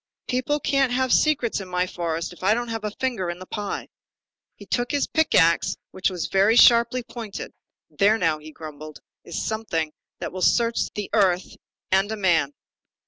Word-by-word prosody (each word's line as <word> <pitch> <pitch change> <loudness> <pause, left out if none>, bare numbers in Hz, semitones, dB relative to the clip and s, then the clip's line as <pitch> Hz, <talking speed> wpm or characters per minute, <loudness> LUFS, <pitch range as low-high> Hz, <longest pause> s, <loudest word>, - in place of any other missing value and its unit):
People 255 +4 0
can't 275 -2 +1
have 260 0 +1
secrets 275 -9 +2
in 190 - -8
my 180 0 0
forest 170 -1 -3
if - - -17
I 205 +3 +4
don't 240 0 -3
have 225 -1 -4
a 210 - -1
finger 215 -5 -2
in 175 - -4
the 185 - -10
pie." 205 +1 -4 0.7
He - - -13
took 245 0 -1
his 285 -1 +1
pick 315 -1 +1
axe 170 0 +3
which 185 - 0
was 180 -3 -4
very 200 +4 +3
sharply 235 +1 +6
pointed. 230 -3 -7 0.4
"There 210 +2 +2
now," 165 -6 +1
he 155 +1 -11
grumbled, 155 -1 -10 0.2
"is 170 - -4
something 170 -8 -2 0.3
that - - -4
will 185 - -6
search 230 +5 +2
the 210 -1 -5
earth 190 -4 +2 0.4
and 195 +2 +2
a 220 - -3
man." 165 -8 +2
205 Hz, 185 wpm, -24 LUFS, 175-235 Hz, 0.7 s, sharply